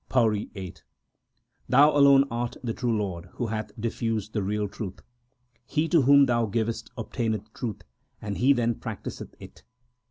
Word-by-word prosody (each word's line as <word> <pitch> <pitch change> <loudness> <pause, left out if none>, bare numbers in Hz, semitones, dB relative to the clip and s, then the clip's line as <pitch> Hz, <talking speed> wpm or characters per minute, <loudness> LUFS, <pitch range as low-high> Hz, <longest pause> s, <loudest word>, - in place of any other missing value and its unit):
PAURI 110 -5 +2
VIII 95 -3 -7 0.9
Thou 145 +3 +6
alone 140 -1 +7
art 120 0 -3
the 115 -2 -2
true 120 -2 -1
Lord 90 -5 -3
who 120 - -3
hath 110 -1 -3
diffused 110 -1 -2
the 105 - 0
real 105 +2 -1
truth. 95 -1 -7 0.6
He 155 +2 0
to 165 -4 +5
whom 140 +1 +6
Thou 120 -3 +1
givest 115 +2 -2
obtaineth 110 -1 -3
truth, 115 -6 -5 0.4
and 105 -2 -5
he 130 +3 +5
then 120 -3 +2
practiseth - - -7
it. - - -13
115 Hz, 155 wpm, -26 LUFS, 105-125 Hz, 0.9 s, alone